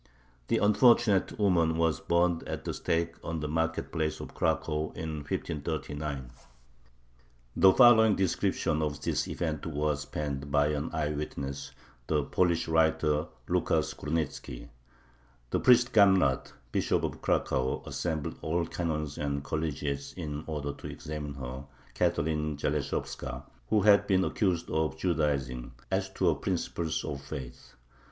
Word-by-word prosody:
The -, -, +2 dB
unfortunate 105 Hz, -1 st, +4 dB
woman 85 Hz, -6 st, +3 dB
was 80 Hz, -4 st, +2 dB
burned 85 Hz, 0 st, +2 dB
at -, -, -5 dB
the -, -, -2 dB
stake 85 Hz, 0 st, -1 dB
on 80 Hz, -1 st, -3 dB
the 75 Hz, -, -3 dB
market 80 Hz, +2 st, -1 dB
place 80 Hz, -2 st, -1 dB
of -, -, -8 dB
Cracow 75 Hz, 0 st, 0 dB
in 80 Hz, -1 st, -4 dB
1539. 75 Hz, -3 st, -4 dB, 1.2 s
The 95 Hz, -, +7 dB
following 110 Hz, -2 st, +7 dB
description 80 Hz, -4 st, 0 dB
of 75 Hz, -1 st, -2 dB
this -, -, 0 dB
event 80 Hz, -2 st, -3 dB
was 75 Hz, -1 st, -1 dB
penned 70 Hz, -1 st, -4 dB
by 75 Hz, +1 st, +3 dB
an 75 Hz, +1 st, -2 dB
eye 75 Hz, -1 st, -1 dB
witness, 70 Hz, -2 st, -5 dB, 0.4 s
the 75 Hz, -2 st, +1 dB
Polish 85 Hz, +2 st, +1 dB
writer 80 Hz, -1 st, +2 dB, 0.2 s
Lucas -, -, +1 dB
Gurnitzki: 75 Hz, -4 st, -4 dB, 0.8 s
The -, -, +1 dB
priest 125 Hz, +1 st, +5 dB
Gamrat, 95 Hz, -, +4 dB, 0.2 s
Bishop -, -, +1 dB
of -, -, -3 dB
Cracow, 65 Hz, 0 st, 0 dB
assembled 80 Hz, -4 st, -3 dB
all 85 Hz, +2 st, 0 dB
canons 75 Hz, -4 st, -3 dB
and 70 Hz, -1 st, -2 dB
collegiates 70 Hz, -2 st, -3 dB
in 75 Hz, -4 st, -5 dB
order 75 Hz, -2 st, -3 dB
to -, -, -9 dB
examine 75 Hz, -2 st, -6 dB
her 65 Hz, 0 st, -6 dB, 0.3 s
[Catherine 75 Hz, -1 st, 0 dB
Zaleshovska, 65 Hz, -2 st, -3 dB, 0.3 s
who 105 Hz, -, +3 dB
had 100 Hz, 0 st, +5 dB
been 95 Hz, -2 st, +3 dB
accused 90 Hz, -5 st, 0 dB
of 80 Hz, 0 st, 0 dB
"Judaizing"] 70 Hz, -8 st, -1 dB, 0.2 s
as -, -, 0 dB
to -, -, +2 dB
her -, -, +4 dB
principles 80 Hz, -2 st, -2 dB
of 70 Hz, -3 st, -4 dB
faith. 70 Hz, -3 st, -8 dB
75 Hz, 135 wpm, -29 LUFS, 70-85 Hz, 1.2 s, The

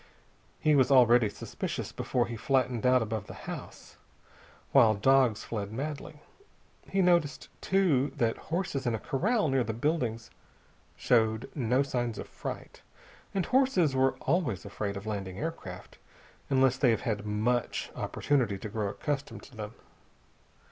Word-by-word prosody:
He 155 Hz, -, +3 dB
was 135 Hz, -2 st, +4 dB
already 120 Hz, -4 st, +6 dB
suspicious -, -, -5 dB
before 120 Hz, -1 st, 0 dB
he 120 Hz, -, -6 dB
flattened 125 Hz, 0 st, +1 dB
out 125 Hz, -1 st, +4 dB
above 110 Hz, -2 st, -4 dB
the -, -, -9 dB
house, -, -, -8 dB, 0.7 s
while 110 Hz, -1 st, +6 dB
dogs 125 Hz, 0 st, +3 dB
fled 105 Hz, -3 st, -4 dB
madly. 145 Hz, +4 st, -6 dB, 0.7 s
He 195 Hz, -1 st, +2 dB
noticed, 170 Hz, -6 st, +2 dB
too, 165 Hz, -9 st, +2 dB
that 115 Hz, -1 st, +1 dB
horses 160 Hz, -6 st, -2 dB
in 115 Hz, -, +1 dB
a -, -, -4 dB
corral 195 Hz, -, +1 dB
near 135 Hz, -2 st, +2 dB
the 110 Hz, -1 st, -3 dB
buildings 120 Hz, -4 st, -1 dB, 0.6 s
showed 110 Hz, -2 st, +1 dB
no 130 Hz, 0 st, +1 dB
signs 120 Hz, -4 st, -2 dB
of -, -, -6 dB
fright. -, -, -7 dB, 0.5 s
And 190 Hz, -, +1 dB
horses 255 Hz, -, +3 dB
are 130 Hz, 0 st, +3 dB
always 135 Hz, -, 0 dB
afraid 100 Hz, 0 st, -4 dB
of 100 Hz, -, -8 dB
landing 100 Hz, -3 st, -4 dB
aircraft, 145 Hz, -, -6 dB, 0.5 s
unless 130 Hz, -1 st, +3 dB
they 130 Hz, -2 st, +3 dB
have 115 Hz, -, +2 dB
had 105 Hz, -2 st, -2 dB
much 115 Hz, +4 st, -1 dB
opportunity 125 Hz, -9 st, 0 dB
to 105 Hz, -, -7 dB
grow 105 Hz, -1 st, -2 dB
accustomed 140 Hz, +7 st, -4 dB
to 130 Hz, -, -15 dB
them. 105 Hz, 0 st, -7 dB
125 Hz, 145 wpm, -29 LUFS, 110-145 Hz, 0.7 s, already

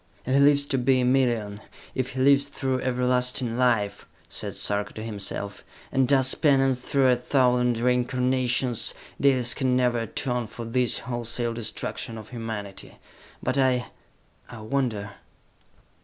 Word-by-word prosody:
"If 130 Hz, -, -1 dB
he 140 Hz, -, +4 dB
lives 140 Hz, 0 st, +5 dB
to 135 Hz, -2 st, -1 dB
be 130 Hz, +1 st, +3 dB
a -, -, +1 dB
million, 120 Hz, -5 st, +1 dB, 0.3 s
if 130 Hz, -1 st, -3 dB
he 130 Hz, -, -2 dB
lives 140 Hz, +1 st, +5 dB
through 130 Hz, -2 st, -2 dB
everlasting 125 Hz, -1 st, 0 dB
life," 115 Hz, -5 st, 0 dB, 0.2 s
said -, -, -6 dB
Sarka 105 Hz, 0 st, -1 dB
to 110 Hz, -, -7 dB
himself, 100 Hz, -2 st, -4 dB, 0.3 s
"and 130 Hz, -1 st, +2 dB
does 135 Hz, -1 st, +4 dB
penance 135 Hz, -4 st, +2 dB
through 130 Hz, +1 st, +2 dB
a 125 Hz, -, +5 dB
thousand 125 Hz, -1 st, +2 dB
reincarnations, 125 Hz, 0 st, +1 dB, 0.3 s
Dalis 130 Hz, -3 st, +3 dB
can 130 Hz, -2 st, +1 dB
never 125 Hz, -2 st, +2 dB
atone 120 Hz, +1 st, -3 dB
for 115 Hz, +2 st, -8 dB
this 125 Hz, +1 st, +1 dB
wholesale 120 Hz, -1 st, -2 dB
destruction 115 Hz, 0 st, -3 dB
of 110 Hz, -1 st, -10 dB
humanity! 110 Hz, -5 st, -7 dB, 0.5 s
But 130 Hz, +2 st, 0 dB
I... 130 Hz, -2 st, +1 dB, 0.6 s
I 115 Hz, -3 st, -9 dB
wonder!" 110 Hz, -4 st, -2 dB
125 Hz, 140 wpm, -25 LUFS, 115-130 Hz, 0.6 s, lives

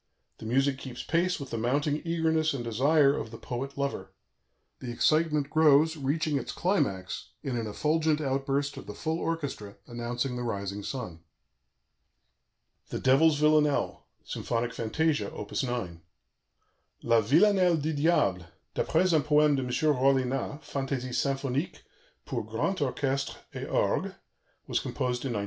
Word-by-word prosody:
The 110 Hz, -, -7 dB
music 135 Hz, +3 st, +1 dB
keeps 125 Hz, -3 st, -7 dB
pace 175 Hz, +2 st, +1 dB
with 140 Hz, -2 st, -7 dB
the 115 Hz, -, -2 dB
mounting 145 Hz, +6 st, 0 dB
eagerness 160 Hz, -2 st, +1 dB
and 125 Hz, -, -4 dB
desire 140 Hz, +5 st, +3 dB
of 115 Hz, -, -4 dB
the 115 Hz, -, -9 dB
poet 135 Hz, +5 st, -5 dB
lover; 140 Hz, -9 st, -3 dB, 0.7 s
the 125 Hz, -, -5 dB
excitement 150 Hz, +2 st, +2 dB
grows, 155 Hz, 0 st, +5 dB
reaching 150 Hz, +1 st, 0 dB
its -, -, -5 dB
climax 100 Hz, -, -1 dB
in 130 Hz, -, -2 dB
an 115 Hz, -2 st, -2 dB
effulgent 155 Hz, +7 st, +1 dB
outburst 140 Hz, 0 st, -1 dB
of -, -, -9 dB
the -, -, -7 dB
full 160 Hz, 0 st, -2 dB
orchestra, 140 Hz, -13 st, -4 dB
announcing 120 Hz, +2 st, -3 dB
the -, -, -3 dB
rising 100 Hz, -3 st, -3 dB
sun. 110 Hz, -8 st, -5 dB, 1.7 s
"THE -, -, -3 dB
DEVIL'S 145 Hz, +4 st, +4 dB
VILLANELLE," 150 Hz, -1 st, +2 dB, 0.2 s
SYMPHONIC 120 Hz, 0 st, -2 dB
FANTASIA: 150 Hz, +7 st, 0 dB
Op. -, -, -7 dB
9 115 Hz, -10 st, -3 dB, 1.0 s
_La 115 Hz, -1 st, +4 dB
Villanelle 180 Hz, -, +4 dB
du 155 Hz, +1 st, -1 dB
Diable, 145 Hz, -, +2 dB, 0.3 s
d'après 185 Hz, -1 st, +2 dB
un 155 Hz, -, +4 dB
poème 150 Hz, 0 st, +4 dB
de 135 Hz, -, 0 dB
M. 125 Hz, -, -4 dB, 0.3 s
Rollinat, 135 Hz, +2 st, +1 dB
Fantasie 135 Hz, -2 st, -3 dB
symphonique, 135 Hz, +3 st, -1 dB, 0.4 s
pour -, -, -3 dB
grand 195 Hz, -, -1 dB
orchestre__et 135 Hz, 0 st, -3 dB
orgue_, -, -, 0 dB, 0.5 s
was -, -, 0 dB
composed 125 Hz, +1 st, -2 dB
in 130 Hz, -, -1 dB
1901. 105 Hz, -, -1 dB
140 Hz, 140 wpm, -28 LUFS, 120-155 Hz, 1.7 s, grows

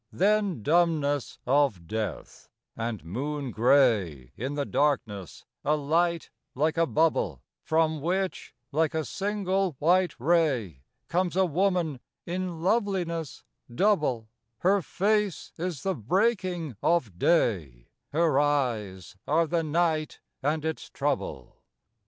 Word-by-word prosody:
Then 200 Hz, -, +1 dB
dumbness 150 Hz, -3 st, +1 dB
of 130 Hz, -10 st, +2 dB
death; 105 Hz, 0 st, -5 dB, 0.3 s
and, 115 Hz, -6 st, -4 dB
moon 140 Hz, -, -3 dB
gray, 110 Hz, -, +2 dB
In 135 Hz, +5 st, -4 dB
the 145 Hz, -1 st, -1 dB
darkness 115 Hz, -, -1 dB, 0.2 s
a 150 Hz, -, +2 dB
light 165 Hz, +3 st, 0 dB, 0.2 s
like 155 Hz, +4 st, +1 dB
a 165 Hz, 0 st, +2 dB
bubble, 155 Hz, -, +1 dB, 0.2 s
From 160 Hz, -1 st, +1 dB
which, 185 Hz, +4 st, -2 dB, 0.2 s
like 160 Hz, +1 st, +1 dB
a 160 Hz, -1 st, -1 dB
single 195 Hz, -, -1 dB
white 175 Hz, +2 st, +2 dB
ray, 130 Hz, -, +1 dB, 0.3 s
Comes 180 Hz, 0 st, 0 dB
a 190 Hz, 0 st, +4 dB
woman 175 Hz, -4 st, 0 dB, 0.3 s
in 175 Hz, -2 st, -4 dB
loveliness 185 Hz, -, -1 dB, 0.3 s
double; 145 Hz, -, +1 dB, 0.3 s
Her 195 Hz, +2 st, +3 dB
face 205 Hz, +1 st, 0 dB
is 175 Hz, -5 st, -3 dB
the 195 Hz, -, +1 dB
breaking 180 Hz, -, 0 dB
of 125 Hz, -, +1 dB
day, 85 Hz, -, +1 dB, 0.2 s
Her 155 Hz, -2 st, +3 dB
eyes 115 Hz, -11 st, -1 dB
are 165 Hz, +3 st, +3 dB
the 165 Hz, +1 st, 0 dB
night 160 Hz, 0 st, 0 dB, 0.2 s
and 150 Hz, +3 st, 0 dB
its 160 Hz, -1 st, -4 dB
trouble. -, -, -3 dB
155 Hz, 115 wpm, -27 LUFS, 125-175 Hz, 0.3 s, a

